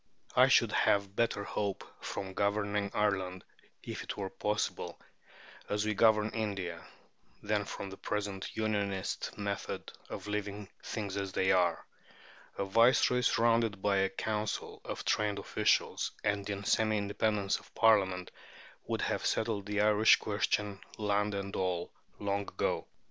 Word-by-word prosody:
I -, -, +7 dB
should -, -, +5 dB
have 100 Hz, -1 st, +2 dB
better 115 Hz, -3 st, +1 dB
hope 100 Hz, -1 st, -2 dB, 0.2 s
from 95 Hz, -1 st, -4 dB
governing 100 Hz, 0 st, 0 dB
Ireland 95 Hz, -3 st, 0 dB, 0.4 s
(if -, -, -5 dB
it -, -, -5 dB
were 95 Hz, -2 st, -3 dB
possible) 105 Hz, +2 st, -2 dB, 0.7 s
as 105 Hz, +1 st, 0 dB
we 110 Hz, -, +1 dB
govern 110 Hz, 0 st, +4 dB
India, 100 Hz, -6 st, -3 dB, 0.6 s
than 105 Hz, -1 st, 0 dB
from 100 Hz, 0 st, -6 dB
the 95 Hz, -, -9 dB
present 100 Hz, -2 st, -3 dB
Unionist 100 Hz, -3 st, -1 dB
method 100 Hz, -1 st, -4 dB, 0.2 s
of -, -, -6 dB
leaving 105 Hz, -1 st, -4 dB
"things 100 Hz, -3 st, -4 dB
as 100 Hz, -1 st, -3 dB
they 95 Hz, -, +3 dB
are." 90 Hz, -2 st, +2 dB, 0.7 s
A 100 Hz, -, -1 dB
Viceroy 120 Hz, +4 st, +4 dB
surrounded 115 Hz, -4 st, +3 dB
by 100 Hz, 0 st, +2 dB
a 95 Hz, 0 st, +3 dB
Council 105 Hz, +1 st, -3 dB
of -, -, -5 dB
trained 105 Hz, -1 st, +1 dB
officials, -, -, +1 dB
and 100 Hz, -1 st, 0 dB
in 100 Hz, 0 st, -3 dB
semi 110 Hz, +1 st, +2 dB
independence 100 Hz, 0 st, 0 dB
of -, -, -19 dB
Parliament, 95 Hz, -5 st, +3 dB, 0.6 s
would -, -, -1 dB
have -, -, -1 dB
settled 110 Hz, -3 st, 0 dB
the 105 Hz, 0 st, +1 dB
Irish 105 Hz, +1 st, +6 dB
question, 105 Hz, -1 st, -1 dB, 0.2 s
land 105 Hz, -1 st, +1 dB
and 100 Hz, 0 st, -4 dB
all, 90 Hz, -2 st, -1 dB, 0.2 s
long 100 Hz, 0 st, -1 dB
ago. 100 Hz, -, -1 dB
100 Hz, 140 wpm, -32 LUFS, 100-105 Hz, 0.7 s, I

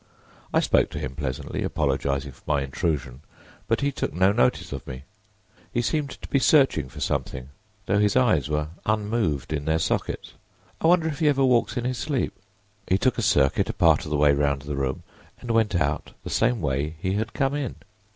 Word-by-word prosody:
I -, -, +3 dB
spoke -, -, +3 dB
to -, -, -7 dB
him 65 Hz, -, -4 dB
pleasantly, 65 Hz, -3 st, -4 dB
apologizing 70 Hz, 0 st, -1 dB
for -, -, -20 dB
my 75 Hz, -2 st, +1 dB
intrusion, 70 Hz, -2 st, -2 dB, 0.5 s
but 115 Hz, +1 st, +1 dB
he 140 Hz, 0 st, +1 dB
took -, -, -3 dB
no 95 Hz, +2 st, +4 dB
notice 65 Hz, -10 st, +1 dB
of -, -, -7 dB
me. 65 Hz, +1 st, -7 dB, 0.7 s
He 120 Hz, -, 0 dB
seemed 150 Hz, +1 st, 0 dB
to -, -, -9 dB
be 140 Hz, -, +2 dB
searching 135 Hz, -, +4 dB
for -, -, -10 dB
something, 65 Hz, +1 st, -2 dB, 0.4 s
though 100 Hz, -, +2 dB
his 105 Hz, -1 st, +2 dB
eyes 105 Hz, -, +3 dB
were 75 Hz, 0 st, -1 dB, 0.2 s
unmoved 105 Hz, -, 0 dB
in 75 Hz, -1 st, -3 dB
their 80 Hz, +1 st, +2 dB
sockets. 80 Hz, -, -2 dB, 0.5 s
I -, -, +3 dB
wonder 170 Hz, -1 st, +4 dB
if 150 Hz, -2 st, -3 dB
he 155 Hz, -, +2 dB
ever 135 Hz, -2 st, +3 dB
walks 125 Hz, -1 st, +2 dB
in 120 Hz, -, -2 dB
his 125 Hz, -1 st, -2 dB
sleep. 145 Hz, -5 st, -1 dB, 0.5 s
He 95 Hz, -, +3 dB
took 125 Hz, +4 st, +1 dB
a -, -, +1 dB
circuit 70 Hz, -10 st, +2 dB
a -, -, -1 dB
part -, -, +4 dB
of -, -, -6 dB
the 75 Hz, -, 0 dB
way 75 Hz, 0 st, +5 dB
round 70 Hz, -1 st, 0 dB
the 75 Hz, 0 st, -4 dB
room, 65 Hz, -1 st, -2 dB, 0.4 s
and 120 Hz, -, -4 dB
went 110 Hz, -3 st, +2 dB
out 75 Hz, -2 st, -1 dB
the -, -, -6 dB
same 120 Hz, 0 st, +2 dB
way 75 Hz, +2 st, -1 dB
he 95 Hz, +3 st, -1 dB
had 110 Hz, +2 st, -2 dB
come 135 Hz, 0 st, 0 dB
in. 145 Hz, -4 st, -3 dB
95 Hz, 205 wpm, -25 LUFS, -, 0.7 s, way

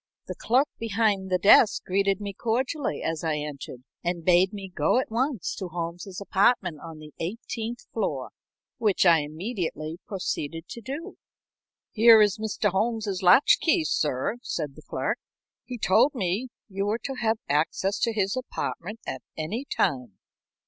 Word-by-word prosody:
The -, -, -5 dB
clerk 260 Hz, +5 st, +2 dB
behind 210 Hz, -3 st, 0 dB
the 185 Hz, -, +2 dB
desk 200 Hz, +3 st, +6 dB
greeted 195 Hz, +1 st, +1 dB
my 200 Hz, -1 st, -5 dB
cordially 255 Hz, -, -1 dB
as 165 Hz, 0 st, -2 dB
I 160 Hz, -2 st, 0 dB
entered, 140 Hz, -4 st, -7 dB, 0.2 s
and 175 Hz, -1 st, -2 dB
bade 180 Hz, +1 st, +5 dB
me 200 Hz, -2 st, -7 dB
go 150 Hz, +9 st, +2 dB
at 255 Hz, -, -1 dB
once 250 Hz, -, -1 dB
to 190 Hz, -, -4 dB
Holmes's 175 Hz, +2 st, -5 dB
apartment 200 Hz, -4 st, +2 dB
on 165 Hz, -1 st, -9 dB
the 155 Hz, -1 st, -12 dB
eighteenth 230 Hz, +5 st, -5 dB
floor, 145 Hz, -, -2 dB, 0.5 s
which 205 Hz, -4 st, +2 dB
I 170 Hz, -2 st, +7 dB
immediately 160 Hz, 0 st, -4 dB
proceeded 165 Hz, -4 st, -4 dB
to 235 Hz, -, -8 dB
do. 285 Hz, -, -7 dB, 0.7 s
"Here 225 Hz, 0 st, +7 dB
is 210 Hz, -1 st, +3 dB
Mr. 215 Hz, -1 st, 0 dB
Holmes's 215 Hz, -1 st, -1 dB
latch 185 Hz, +10 st, +6 dB
key, 330 Hz, 0 st, +3 dB
sir," 150 Hz, -, 0 dB
said 150 Hz, -, -4 dB
the -, -, -13 dB
clerk. -, -, -2 dB, 0.5 s
"He 250 Hz, -, -6 dB
told 235 Hz, +7 st, +3 dB
me 200 Hz, +3 st, -1 dB, 0.2 s
you 195 Hz, -1 st, -3 dB
were 220 Hz, +3 st, 0 dB
to 275 Hz, -, -3 dB
have 220 Hz, -1 st, +2 dB
access 165 Hz, +7 st, 0 dB
to 230 Hz, -, +1 dB
his 200 Hz, -2 st, 0 dB
apartment 225 Hz, -4 st, -5 dB
at -, -, -5 dB, 0.2 s
any 205 Hz, -, -3 dB
time." 125 Hz, -, -1 dB
195 Hz, 155 wpm, -26 LUFS, 165-230 Hz, 0.7 s, I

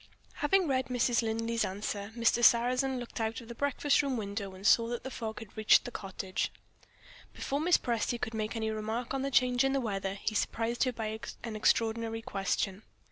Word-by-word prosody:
Having 360 Hz, +4 st, +3 dB
read 260 Hz, -2 st, +1 dB
Mrs. 245 Hz, -1 st, +2 dB
Linley's 230 Hz, +1 st, -1 dB
answer, 200 Hz, +1 st, -3 dB
Mr. 235 Hz, +1 st, +3 dB
Sarrazin 255 Hz, +3 st, +4 dB
looked 240 Hz, -1 st, -6 dB
out 225 Hz, 0 st, -1 dB
of 235 Hz, -, -12 dB
the 235 Hz, -, -7 dB
breakfast 285 Hz, +3 st, +2 dB
room 275 Hz, -3 st, -1 dB
window, 200 Hz, -2 st, -4 dB
and 190 Hz, +2 st, -11 dB
saw 230 Hz, +1 st, +5 dB
that 240 Hz, 0 st, -4 dB
the 265 Hz, -, -6 dB
fog 220 Hz, -3 st, -5 dB
had 225 Hz, -3 st, -10 dB
reached 215 Hz, 0 st, +5 dB
the 245 Hz, -, -5 dB
cottage. 190 Hz, -3 st, -3 dB, 0.8 s
Before 280 Hz, -, -2 dB
Mrs. 340 Hz, +3 st, +3 dB
Presty 235 Hz, 0 st, 0 dB
could 230 Hz, -, -3 dB
make 215 Hz, +1 st, -2 dB
any 220 Hz, -1 st, -1 dB
remark 220 Hz, +3 st, -3 dB
on 270 Hz, -, -1 dB
the 275 Hz, -, -1 dB
change 250 Hz, -1 st, +3 dB
in 270 Hz, 0 st, +2 dB
the 275 Hz, -, +2 dB
weather, 195 Hz, -5 st, -2 dB
he 205 Hz, +2 st, -3 dB
surprised 230 Hz, +3 st, 0 dB
her 255 Hz, -, +1 dB
by 220 Hz, -2 st, -4 dB, 0.2 s
an 230 Hz, -2 st, -5 dB
extraordinary 225 Hz, +1 st, +1 dB
question. 195 Hz, 0 st, -1 dB
230 Hz, 195 wpm, -31 LUFS, 215-250 Hz, 0.8 s, saw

